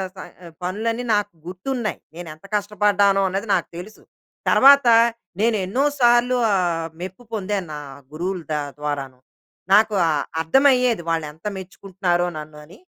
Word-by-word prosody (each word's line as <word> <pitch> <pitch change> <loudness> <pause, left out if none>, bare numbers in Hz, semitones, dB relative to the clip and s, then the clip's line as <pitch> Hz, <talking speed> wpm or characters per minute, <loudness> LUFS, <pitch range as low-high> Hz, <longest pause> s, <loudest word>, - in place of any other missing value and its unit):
స - - -20
ఆహ్, 170 -2 -14
పనులన్ని 225 +6 -2
నాకు 205 -1 -1
గుర్తున్నాయి. 215 +6 -4 0.2
నేనేంత 165 -1 -10
కష్టపడ్డానో 205 -1 +2
అన్నది 195 +4 -3
నాకు 175 - -2
తెలుసు. 200 +5 -10 0.5
తర్వాత 280 -1 +6 0.5
నేనెన్నో 220 +2 +1 0.2
సార్లు 240 +1 +4 0.2
ఆహ్, 170 -3 0
మెప్పు 190 +6 -8
పొందాను 200 -3 -2
నా 150 - -5 0.3
గురువుల 180 +3 -3
ద 155 - 0 0.2
ద్వారాను. 140 -3 -4 0.5
నాకు 215 +1 +5
ఆహ్, 150 -3 0 0.2
అర్థమయ్యేది 250 - +3
వాళ్ళెంత 160 0 -4
మెచ్చుకుంటున్నారో 185 -1 -2
నన్ను 150 0 -9
అని. 165 - -17
190 Hz, 125 wpm, -21 LUFS, 170-220 Hz, 0.5 s, తర్వాత